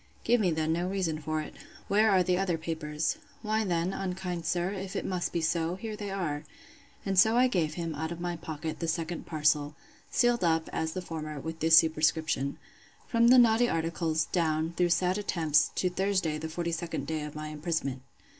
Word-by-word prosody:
—Give 240 0 +3
me 190 - +3
then 160 -1 0
no 175 +2 -1
reason 175 -5 -1
for 155 +1 -2
it. - - -8 0.3
Where 215 +2 +4
are 190 -2 +4
the 180 0 +1
other 180 -2 0
papers? 160 - -2 0.3
Why, 215 0 +1
then, 175 -1 0
unkind 180 -3 -4
sir, 175 +2 0
if 195 0 -6
it - - -2
must 180 -2 -2
be 170 - -1
so, 165 +1 0
here 215 +2 -6
they 205 -1 -5
are. 165 -7 -3 0.6
And 195 -2 +2
so 220 +4 +5
I 250 - +6
gave 165 -10 0
him, 165 -2 -3
out 160 +2 -4
of 170 - -5
my 175 0 -2
pocket, 160 -1 -5
the 165 - -2
second 165 +1 -3
parcel, 150 -2 +1 0.3
sealed 240 -3 +2
up, 165 -1 +2
as 160 0 -2
the 185 - -4
former, 155 -3 -5
with 160 +3 -6
this 160 +1 +6
superscription; 155 -3 +2 0.5
From 235 0 +3
the 255 +2 +8
naughty 240 0 +5
articles, 165 -1 0
down, 160 -1 0
through 175 0 +2
sad 180 +3 +2
attempts, 160 -7 +2
to 185 - +1
Thursday 185 -5 0
the 160 - -4
42d 170 0 -3
day 160 -1 -2
of 150 0 -7
my 155 0 -5
imprisonment. 150 -4 -3
170 Hz, 195 wpm, -29 LUFS, 160-190 Hz, 0.6 s, the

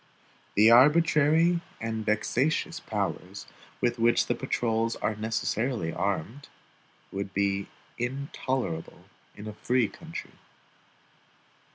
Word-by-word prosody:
The 110 +3 +7
arbitrary 155 +5 +5 0.2
and 110 -1 -3
vexatious 120 +8 0
powers - - -4 0.4
with 120 -1 +1
which 115 +1 +4
the - - +1
patrols 115 -2 -1
are 110 - -1
necessarily 110 -3 -1
armed, 100 - -3 0.6
would 95 0 -5
be 100 0 0 0.3
intolerable 130 - -3 0.3
in 105 - -9
a 105 - -6
free 125 +2 +1
country. - - -9
115 Hz, 95 wpm, -28 LUFS, 105-130 Hz, 0.6 s, The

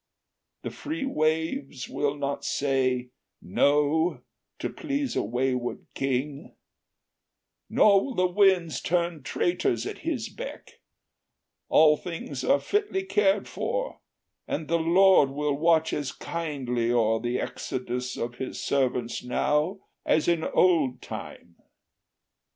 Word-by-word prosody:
The - - -4
free 310 -2 -4
waves 160 - -1
Will 145 0 -1
not 140 0 -3
say, 130 -3 0 0.3
No, 150 - +2 0.3
to - - -3
please 280 -3 -3
a - - +2
wayward 125 +2 -2
king, 135 +3 -3 1.1
Nor 200 -2 +5
will 265 - -5
the 185 - +3
winds 180 -3 +3
turn 170 -2 0
traitors 155 -6 0
at - - -5
his - - -3
beck: - - -9 0.9
All 155 -1 +6
things 165 -6 -6
are 280 +1 +3
fitly 410 - -1
cared 195 +1 +2
for, - - -3 0.5
and 155 - -3
the 170 0 +1
Lord 175 -2 +5
Will 145 +1 -1
watch 160 +1 +2
as 145 -3 -2
kindly 130 -8 -2
o'er 110 -2 +2
the 120 +1 -1
exodus 125 0 -4
Of 120 - -3
us - - -19
his 130 - -5
servants 125 -3 0
now, 150 +9 0 0.2
as 155 - +2
in 170 -2 +2
old 160 -10 +2
time. 85 -1 -9
150 Hz, 120 wpm, -27 LUFS, 130-180 Hz, 1.1 s, All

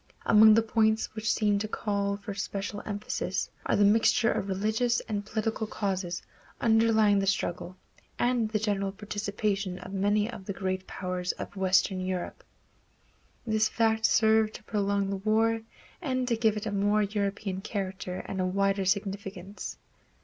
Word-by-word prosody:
Among 215 0 +7
the 225 - +4
points 220 -1 +1
which 220 +1 -1
seem 205 -2 +2
to 215 - -2
call 200 -2 -1
for 205 0 -6
special 200 +1 -4
emphasis 205 0 -3 0.2
are - - +2
the 205 - +4
mixture 225 +2 +4
of 195 - -2
religious 220 +5 +1
and 205 -3 -3
political 220 +1 -2
causes 190 -4 -3 0.4
underlying 220 -2 +4
the 195 - -1
struggle, 185 -1 -1 0.4
and 240 -3 +1
the 215 - 0
general 200 -2 -1
participation 200 -2 -2
of 185 +1 -9
many 205 +2 +2
of 230 -5 -8
the 200 - -3
great 185 0 -3
powers 180 -1 -3
of - - -8
Western 190 0 +2
Europe. 185 -1 -4 1.0
This 220 -1 +2
fact 220 -1 +2
served 220 -1 +3
to - - -10
prolong 200 -2 0
the 195 - -1
war 220 +3 +2 0.4
and 255 -5 -1
to 235 - +2
give 220 -2 +2
it 210 - -4
a 215 - -2
more 205 +1 +2
European 200 -1 -2
character 190 -3 -4
and 190 - -3
a - - +1
wider 195 +1 +1
significance. 195 0 -3
205 Hz, 155 wpm, -28 LUFS, 195-220 Hz, 1.0 s, Among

